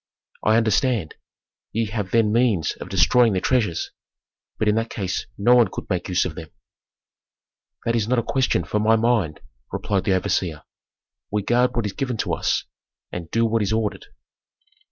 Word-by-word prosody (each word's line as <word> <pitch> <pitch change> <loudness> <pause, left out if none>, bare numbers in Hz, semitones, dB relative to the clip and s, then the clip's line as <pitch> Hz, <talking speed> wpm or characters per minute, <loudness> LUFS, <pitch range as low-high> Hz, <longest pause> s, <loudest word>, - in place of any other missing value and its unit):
"I 110 +1 +4
understand. 115 - +1 0.6
Ye 115 +1 +1
have 105 -4 -3
then 110 0 +3
means 115 -9 +2
of - - -8
destroying 100 +6 +4
the 95 - +1
treasures. 105 -7 0 0.7
But 110 - 0
in 105 - +4
that 115 +1 -1
case 95 -3 -3
no 110 +5 +4
one 120 -2 +6
could - - -6
make 90 0 -2
use 90 - +2
of 90 - -3
them." 80 0 -9 1.4
"That 115 - +1
is 110 -2 0
not 125 +1 +1
a 120 - +1
question 130 +2 +1
for 105 - -1
my 110 +1 +4
mind," 110 -9 +1 0.3
replied 95 -2 -1
the 95 - +2
overseer. 90 -4 -1 0.7
"We 105 0 0
guard 125 +4 +2
what 120 -2 0
is 105 - -3
given 130 -4 -3
to - - -1
us, - - 0 0.5
and 85 -2 -6
do 115 0 +2
what 115 0 +1
is 105 0 0
ordered." 110 -1 -2
110 Hz, 175 wpm, -23 LUFS, 95-115 Hz, 1.4 s, one